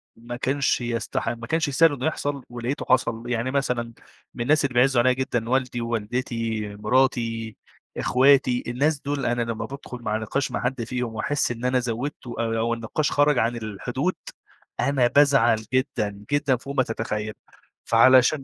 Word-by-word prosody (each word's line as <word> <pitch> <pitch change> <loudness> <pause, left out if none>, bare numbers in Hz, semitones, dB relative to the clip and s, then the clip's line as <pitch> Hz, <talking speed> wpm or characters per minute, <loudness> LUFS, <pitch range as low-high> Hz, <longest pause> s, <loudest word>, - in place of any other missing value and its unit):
ما 120 +1 -8
كانش 135 +1 0
يستح 115 -1 -2
ما 115 0 -6
كانش 160 +2 +1
يستاهل 145 +3 +4
إنه 135 +1 -4
يحصل 145 -3 -2
ولقيته 120 +3 -4
حصل، 120 -2 +1
يعني 120 +2 -1
مثلًا 125 -4 -1 0.4
من - - -6
الناس 150 +3 +3
اللي 135 - -2
بيعزّوا 125 0 +4
عليَّ 130 0 +3
جدًا 120 -3 -2
والدي 130 -2 0
ووالدتي، 115 -1 -2
مراتي، 115 -1 0 0.4
أخواتي، 130 -1 +3
الناس 140 +5 +1
دُول 145 -1 -2
أنا 120 0 0
لّما 115 -1 -3
بادخل 135 0 -8
مع 110 -2 -1
نقاش 120 +5 -2
مع - - -2
حد 125 -1 -1
فيهم 125 -1 -3
وأحس 140 +5 0
إن 120 +1 -5
أنا 125 0 +2
زوّدته 125 +1 -4
آآ 115 -1 0
أو 115 +1 +1
النقاش 115 +6 -2
خرَج 145 -1 +3
عن 115 +2 +1
الحدود، 110 -3 -3 0.6
أنا 135 -3 +2
بازعل 120 -6 +4
جدًا 105 -6 -1
جدًا 145 -2 +2
فوق 140 +3 -7
ما 130 - +4
تتخيل 110 -2 -3 0.5
فعلشان 130 +4 +5
125 Hz, 165 wpm, -24 LUFS, 115-135 Hz, 0.6 s, فعلشان